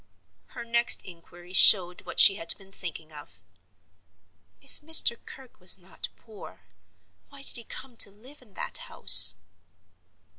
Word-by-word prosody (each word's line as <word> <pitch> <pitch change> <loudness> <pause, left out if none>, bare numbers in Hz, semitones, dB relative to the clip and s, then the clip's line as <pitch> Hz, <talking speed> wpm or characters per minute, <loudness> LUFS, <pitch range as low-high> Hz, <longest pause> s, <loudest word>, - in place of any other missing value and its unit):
Her - - -9
next 235 0 0
inquiry 175 0 -16
showed 180 -2 +3
what - - -5
she - - +7
had 170 -4 -3
been 195 -1 -19
thinking 165 -4 -10
of. 90 -12 -12 1.2
"If 275 - -17
Mr. 310 -5 0
Kirke 265 -2 -16
was 180 0 +1
not 185 0 -10
poor, 220 -3 -17 0.7
why 280 -1 -13
did - - -1
he 235 - -7
come 255 +2 -11
to 205 - +3
live 250 +9 -18
in 210 -6 -23
that - - -7
house?" 85 0 +7
195 Hz, 145 wpm, -24 LUFS, 175-235 Hz, 1.2 s, she